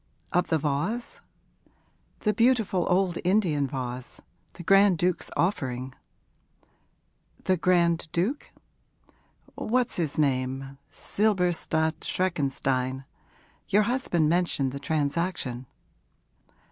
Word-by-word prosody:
'Of 180 0 +2
the 160 - +2
vase?' 155 +12 -2 1.0
'The 210 - +2
beautiful 225 -6 +2
old 180 -1 +2
Indian 175 -7 +2
vase 125 -2 -5 0.3
the 175 - -10
Grand 195 +1 +5
Duke's 180 +1 0
offering.' 130 -8 -1 1.5
'The 185 -1 +2
Grand 170 -1 +2
Duke?' 200 - -1 1.0
'What's 250 +2 0
his 160 -5 -2
name? 135 -1 -1
Silberstadt 175 -6 0
Schreckenstein. 135 -6 -1 0.6
Your 210 +2 +4
husband 210 -9 +1
mentioned 165 -5 +1
the 140 - -6
transaction.' 145 -3 -2
170 Hz, 90 wpm, -27 LUFS, 140-190 Hz, 1.5 s, Grand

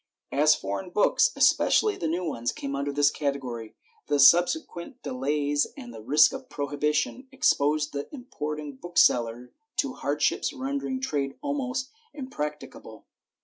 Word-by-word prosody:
As 155 +2 +4
foreign 100 - -5
books, 205 +3 +3
especially 425 -1 +3
the 165 - -3
new 170 +3 -1
ones, 120 -6 -2
came 140 0 -5
under 140 +1 -2
this 145 0 +3
category, 130 -6 -4 0.3
the 145 - +1
consequent 175 - +3
delays 145 +2 0
and 120 -1 -9
the 110 - -9
risk 150 +8 +5
of - - -8
prohibition 150 - -2
exposed 150 - +1
the 140 0 -5
importing 150 - -6
bookseller 125 -7 +1 0.2
to 275 -2 0
hardships 150 - -1
ren 275 +1 -3
dering 260 -1 -4
trade 140 - -2
almost 265 -2 -2 0.2
impracticable. 150 - -7
150 Hz, 135 wpm, -26 LUFS, -, 0.3 s, risk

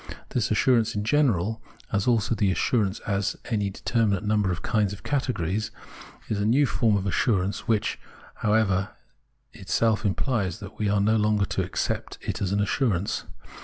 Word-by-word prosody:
This 120 -1 0
assur 120 +3 +4
ance 110 -1 -2
in 105 - -1
general, 110 - +1 0.3
as 100 +2 0
also 115 -2 +2
the 100 -3 +1
assurance 100 +2 +1
as 100 -2 -1
to 125 - -8
any 105 -2 +1
determinate 105 0 0
nimiber 105 -2 +2
of 90 0 -3
kinds 105 -3 +1
of 100 -1 -10
categories, 110 - -1 0.6
is 105 - -1
a - - +1
new 135 +6 +4
form 115 -5 +2
of 95 - -2
assiu 100 0 +1
ance, 100 +2 -4
which, 110 -2 0 0.4
however, 105 -3 +1 0.6
itself 110 -1 0
implies 105 -2 -1
that 100 -1 -10
we 105 -1 +1
are 100 0 +2
no 110 +2 +3
longer 105 -1 +2
to - - -2
accept - - -3
it - - -3
as 95 -2 0
an 100 +1 +1
assurance. 105 -3 0
105 Hz, 175 wpm, -26 LUFS, 100-115 Hz, 0.6 s, assur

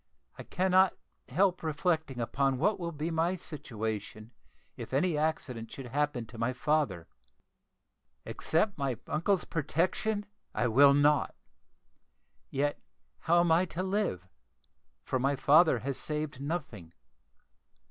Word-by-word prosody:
I - - -9
cannot 185 0 +2 0.3
help 185 -1 +2
reflecting 160 -3 -1
upon 135 +3 0
what 200 +10 +1
will 170 -1 -3
be 155 +2 -3
my 165 +3 +1
situation 110 - -6 0.4
if - - -8
any 170 +3 +2
accident 135 -7 -2
should 130 -3 -8
happen 145 -3 -1
to 115 0 -12
my 115 +2 0
father. 125 - 0 1.2
Accept 180 +3 0
my 135 -4 -1
uncle's 180 +4 0
protection 185 +7 -1 0.3
I 120 - +1
will 140 +4 +6
not; 145 0 +3 1.1
yet 145 +2 -1 0.4
how 170 +1 +3
am 170 -1 +2
I 170 +3 +4
to 180 +1 -4
live, 190 - -1 0.8
for 130 - -1
my 135 +2 +1
father 150 +2 +5
has 140 -2 -2
saved 150 -2 -3
nothing? 140 - -5
150 Hz, 125 wpm, -30 LUFS, 130-170 Hz, 1.2 s, will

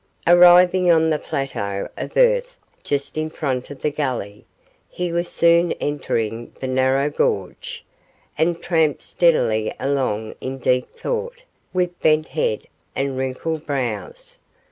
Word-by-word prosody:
Arriving 180 +1 +6
on 160 -1 +4
the 150 - +1
plateau 100 -8 -3
of - - -6
earth - - +3 0.3
just 145 +2 -2
in 155 0 -2
front 130 -5 -3
of 145 -2 -11
the 150 - +1
gully, 125 -8 -4 0.4
he 180 -1 -3
was 170 +1 -1
soon 170 0 +3
entering 115 -6 -3
the - - -4
narrow 130 +2 +2
gorge, 465 - -2 0.5
and 170 +1 0
tramped 160 -4 +1
steadily 110 -11 +2
along 130 -6 -1
in 130 +1 -4
deep 125 0 +1
thought, 480 0 -4 0.3
with 180 -1 -1
bent 155 0 +3
head 110 -9 -1 0.3
and 135 0 -1
wrinkled 130 +5 -3
brows. 155 - -4
155 Hz, 130 wpm, -21 LUFS, 130-175 Hz, 0.5 s, Arriving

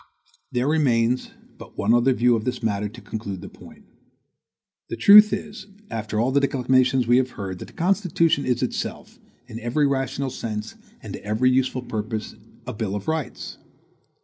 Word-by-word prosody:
There 125 +2 0
remains 125 -6 +1 0.3
but - - -13
one 105 +3 +2
other 120 +2 +4
view 125 -1 +3
of 110 - -2
this 125 0 -3
matter 105 -1 -1
to 115 +3 -13
conclude 100 -3 -6
the - - -9
point. - - -16 1.0
The - - -3
truth 205 - +8
is, 210 -1 -5 0.2
after 110 -1 -3
all 120 +4 +1
the 140 - +3
declamations 130 -1 +2
we 120 +2 +4
have 130 0 +1
heard, 95 -3 -5
that - - -7
the - - -17
Constitution 170 -5 +1
is 125 0 0
itself, 125 - -5 0.3
in 115 -2 -8
every 120 +6 0
rational 135 -1 -1
sense, 110 -2 -5 0.3
and - - -7
to - - -8
every 110 +5 +2
useful 130 0 0
purpose, 110 -1 -4 0.3
A 125 - -5
BILL 105 -2 -3
OF 100 - -6
RIGHTS. 160 -6 -4
125 Hz, 175 wpm, -23 LUFS, 110-135 Hz, 1.0 s, truth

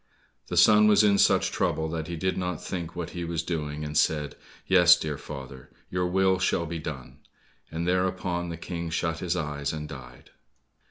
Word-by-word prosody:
The - - -4
son 105 0 +7
was 105 0 +5
in 100 -1 +4
such - - +3
trouble 80 - 0
that 80 -1 -4
he 85 - -4
did 95 +3 -1
not 90 -3 -3
think 85 -2 -5
what 85 -1 -5
he 85 - -5
was 85 -1 -2
doing, 75 -3 -4
and 75 0 -6
said, 75 -1 +1 0.3
"Yes, 90 -2 +6
dear 75 -3 -3
father, 65 -3 -9 0.2
your 90 0 0
will 95 +1 +2
shall 90 -2 +1
be 85 0 -5
done," 75 -5 -8 0.5
and 85 +2 -3
thereupon 90 -1 -1
the 85 - -5
King 85 0 -5
shut 85 0 -2
his 90 -1 -1
eyes, 75 -4 -3
and 75 -1 -5
died. 60 -4 -12
85 Hz, 185 wpm, -27 LUFS, 75-90 Hz, 0.5 s, son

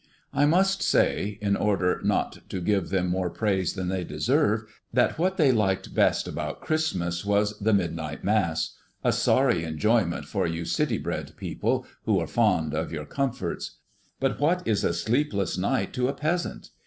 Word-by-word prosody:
I 145 +1 +3
must 190 +5 +3
say, 100 0 +1
in 100 -1 +2
order 95 -4 +1
not - - 0
to 95 - -3
give 95 +1 0
them 95 -1 +1
more 90 0 0
praise 95 -2 0
than 95 -2 -3
they 95 0 -1
deserve, 115 - +1 0.3
that 125 +6 +2
what 185 +3 +1
they 145 -5 +5
liked 95 -5 0
best - - +2
about - - -4
Christmas 90 - -1
was 105 +1 +1
the 110 +2 +2
midnight 85 -6 -1
Mass, 95 -7 +1 0.3
a - - +3
sorry - - +3
enjoyment 85 +4 +1
for - - -1
you 85 0 -3
city - - 0
bred - - -4
people, - - -1 0.2
who - - +3
are - - -1
fond 90 -10 +1
of 80 +2 -2
your 75 -2 -4
comforts. 135 - -3 0.4
But 135 0 0
what 175 +5 +1
is 110 -3 +1
a 85 - +1
sleepless 110 0 0
night 95 +1 0
to 125 0 +1
a 140 - -1
peasant? 160 +5 -2
100 Hz, 170 wpm, -26 LUFS, 90-130 Hz, 0.4 s, they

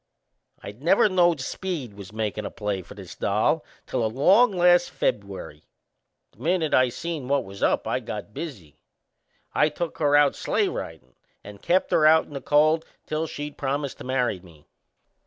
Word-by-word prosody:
I - - -6
never 170 - +3
knowed 175 -4 +3
Speed 150 - -4
was 100 -1 -11
makin' 105 -1 -3
a - - -4
play 105 -3 -3
for - - -13
this - - -10
doll 110 +10 +1 0.2
till 125 -3 -2
along 180 - +4
last 175 -1 +4
Feb'uary. 100 -7 -3 0.7
The - - -28
minute 165 +1 0
I 130 -1 +5
seen 160 0 -5
what 140 -1 +1
was 100 -1 -11
up - - +1
I - - 0
got 105 - -7
busy. 105 - -8 0.7
I 150 - +3
took 165 +2 -5
her 145 -2 +3
out 145 -1 +4
sleigh - - 0
ridin' 65 -7 -7 0.3
and 100 0 -11
kept 185 +2 +1
her 155 - +5
out 160 +1 +5
in - - -14
the 140 - -5
cold 155 +2 +3 0.2
till 155 +1 -2
she'd 145 -1 -7
promised 140 0 -2
to - - -8
marry 125 -6 0
me. 85 -5 -18
140 Hz, 175 wpm, -25 LUFS, 105-160 Hz, 0.7 s, I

